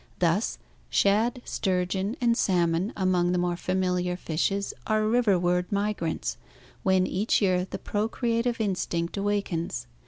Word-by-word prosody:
Thus, -, -, +1 dB, 0.3 s
shad, 220 Hz, -, +2 dB
sturgeon, 190 Hz, +2 st, -1 dB
and 235 Hz, -2 st, +3 dB
salmon 175 Hz, 0 st, +1 dB
among 180 Hz, -2 st, +2 dB
the -, -, +1 dB
more 175 Hz, 0 st, 0 dB
familiar 180 Hz, 0 st, -1 dB
fishes 195 Hz, +4 st, -1 dB
are 215 Hz, -1 st, +2 dB
riverward 185 Hz, -6 st, +2 dB
migrants, 170 Hz, -, -1 dB, 0.4 s
when 190 Hz, -1 st, +3 dB
each 200 Hz, +5 st, +1 dB
year 185 Hz, -2 st, +1 dB
the -, -, -4 dB
procreative 230 Hz, +2 st, -1 dB
instinct 180 Hz, -5 st, -1 dB
awakens. 195 Hz, -, -2 dB
190 Hz, 120 wpm, -27 LUFS, 180-210 Hz, 0.4 s, and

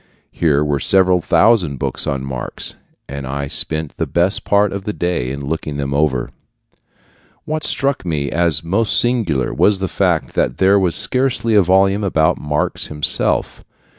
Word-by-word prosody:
Here 75 Hz, -3 st, +1 dB
were 70 Hz, -1 st, -1 dB
several 95 Hz, 0 st, +3 dB
thousand 95 Hz, -8 st, +2 dB
books -, -, -3 dB
on 70 Hz, -1 st, -2 dB
Marx, 65 Hz, -2 st, -5 dB, 0.3 s
and 70 Hz, -1 st, -7 dB
I 70 Hz, +1 st, -3 dB
spent 80 Hz, +2 st, -1 dB
the -, -, -2 dB
best 90 Hz, +3 st, 0 dB
part 100 Hz, -1 st, +2 dB
of 100 Hz, -1 st, -5 dB
the 105 Hz, -, -4 dB
day 85 Hz, -10 st, -2 dB
in 70 Hz, +1 st, -6 dB
looking 75 Hz, -1 st, -4 dB
them 70 Hz, -1 st, -3 dB
over. 70 Hz, -4 st, 0 dB, 1.1 s
What 155 Hz, 0 st, -3 dB
struck 135 Hz, +1 st, 0 dB
me 75 Hz, -5 st, -3 dB
as 85 Hz, -2 st, +1 dB
most 100 Hz, +7 st, +2 dB
singular 110 Hz, -, +1 dB
was 105 Hz, -1 st, +2 dB
the 95 Hz, 0 st, -3 dB
fact -, -, -1 dB
that 60 Hz, -, -1 dB
there 95 Hz, +1 st, +4 dB
was 90 Hz, -3 st, 0 dB
scarcely 125 Hz, -3 st, +1 dB
a 105 Hz, -, +6 dB
volume 95 Hz, +3 st, +2 dB
about 85 Hz, -3 st, +1 dB
Marx 75 Hz, 0 st, -2 dB
himself. 75 Hz, -1 st, 0 dB
85 Hz, 165 wpm, -17 LUFS, 70-100 Hz, 1.1 s, a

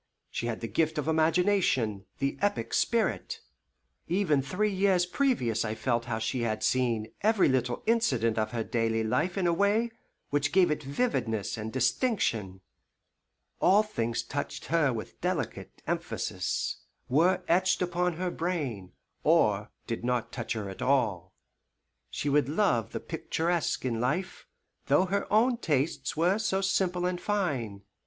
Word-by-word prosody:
She 120 Hz, -, -3 dB
had 115 Hz, -2 st, -3 dB
the 115 Hz, -, -3 dB
gift 155 Hz, +9 st, 0 dB
of 150 Hz, -, -2 dB
imagination, 160 Hz, -, +2 dB
the 140 Hz, 0 st, -1 dB
epic 205 Hz, 0 st, 0 dB
spirit. 235 Hz, -, 0 dB, 0.7 s
Even 170 Hz, -5 st, +2 dB
three 200 Hz, +9 st, -1 dB
years 190 Hz, -2 st, +3 dB
previous 180 Hz, -, +1 dB
I 110 Hz, -1 st, -2 dB
felt 120 Hz, -1 st, 0 dB
how 120 Hz, -2 st, -2 dB
she 115 Hz, +3 st, -2 dB
had 110 Hz, -2 st, -1 dB
seen 120 Hz, -4 st, +1 dB
every 215 Hz, -1 st, +4 dB
little 125 Hz, -2 st, 0 dB
incident 125 Hz, -, +2 dB
of 110 Hz, -, 0 dB
her 115 Hz, -2 st, -2 dB
daily 115 Hz, -1 st, 0 dB
life 165 Hz, -, 0 dB
in 190 Hz, -, +1 dB
a 170 Hz, -, +3 dB
way 205 Hz, +6 st, +2 dB, 0.4 s
which 145 Hz, 0 st, +1 dB
gave 185 Hz, -3 st, +5 dB
it 150 Hz, -, -1 dB
vividness 135 Hz, -, -1 dB
and 110 Hz, 0 st, -5 dB
distinction. 125 Hz, -, 0 dB, 1.0 s
All 205 Hz, +3 st, +5 dB
things 120 Hz, -, -2 dB
touched 145 Hz, +1 st, -4 dB
her 155 Hz, -5 st, +4 dB
with 115 Hz, -3 st, -7 dB
delicate -, -, -3 dB
emphasis -, -, -2 dB, 0.3 s
were 175 Hz, +8 st, +3 dB
etched 185 Hz, +2 st, +3 dB
upon 180 Hz, 0 st, 0 dB
her 180 Hz, +2 st, -2 dB
brain 140 Hz, -, -3 dB, 0.3 s
or 105 Hz, -11 st, +3 dB, 0.2 s
did 115 Hz, -1 st, -4 dB
not 125 Hz, -1 st, -1 dB
touch 120 Hz, -2 st, -3 dB
her 110 Hz, -3 st, -4 dB
at 95 Hz, +5 st, -8 dB
all. 105 Hz, -9 st, +1 dB, 0.7 s
She -, -, -4 dB
would 145 Hz, -1 st, +3 dB
love 150 Hz, -, +1 dB
the -, -, -3 dB
picturesque 170 Hz, -4 st, -1 dB
in 115 Hz, -3 st, -1 dB
life, 180 Hz, +10 st, -2 dB, 0.4 s
though 185 Hz, -, +4 dB
her 200 Hz, +2 st, -2 dB
own 235 Hz, +4 st, +4 dB
tastes 145 Hz, -, -1 dB
were 180 Hz, +6 st, +3 dB
so 195 Hz, -3 st, 0 dB
simple 185 Hz, -2 st, +1 dB
and 180 Hz, -1 st, -1 dB
fine. 135 Hz, -, -2 dB
145 Hz, 150 wpm, -29 LUFS, 115-185 Hz, 1.0 s, gave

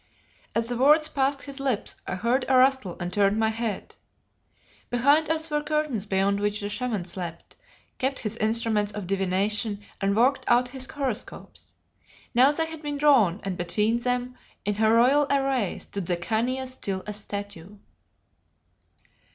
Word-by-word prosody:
As 230 Hz, 0 st, 0 dB
the 240 Hz, 0 st, -3 dB
words 300 Hz, +4 st, +5 dB
passed 275 Hz, 0 st, 0 dB
his 280 Hz, -1 st, -7 dB
lips 265 Hz, -6 st, -1 dB
I -, -, -2 dB
heard 240 Hz, +7 st, +1 dB
a 260 Hz, -, +5 dB
rustle 260 Hz, -8 st, +3 dB
and 175 Hz, 0 st, -4 dB
turned 200 Hz, +1 st, +2 dB
my 220 Hz, 0 st, +2 dB
head. 220 Hz, -2 st, -4 dB, 1.0 s
Behind 285 Hz, +6 st, +3 dB
us 320 Hz, 0 st, -1 dB
were 295 Hz, 0 st, +1 dB
curtains 295 Hz, -8 st, -1 dB
beyond 200 Hz, +1 st, +1 dB
which 205 Hz, 0 st, -1 dB
the 205 Hz, -, -4 dB
Shaman 220 Hz, -5 st, -2 dB
slept, 175 Hz, -2 st, -7 dB, 0.4 s
kept 265 Hz, +1 st, 0 dB
his 215 Hz, -2 st, -4 dB
instruments 220 Hz, -2 st, +1 dB
of 205 Hz, -2 st, -5 dB
divination 195 Hz, +3 st, 0 dB, 0.2 s
and 200 Hz, 0 st, +1 dB
worked 260 Hz, +4 st, +3 dB
out 245 Hz, +1 st, +3 dB
his 260 Hz, 0 st, -5 dB
horoscopes. 270 Hz, -7 st, -5 dB, 0.6 s
Now 255 Hz, +4 st, +6 dB
they 320 Hz, +2 st, 0 dB
had 320 Hz, -1 st, -8 dB
been 290 Hz, -1 st, -3 dB
drawn, 245 Hz, -, +4 dB
and 195 Hz, -2 st, -3 dB
between 210 Hz, +7 st, 0 dB
them, 250 Hz, +1 st, -2 dB, 0.3 s
in 205 Hz, -, +1 dB
her 220 Hz, +1 st, +2 dB
royal 275 Hz, +5 st, +4 dB
array, 270 Hz, -7 st, +1 dB
stood 195 Hz, -4 st, -5 dB
the 175 Hz, -, +1 dB
Khania 235 Hz, +8 st, -1 dB
still 200 Hz, -7 st, -4 dB
as 210 Hz, -1 st, -4 dB
a -, -, -6 dB
statue. 205 Hz, -2 st, -7 dB
230 Hz, 160 wpm, -26 LUFS, 200-270 Hz, 1.0 s, Now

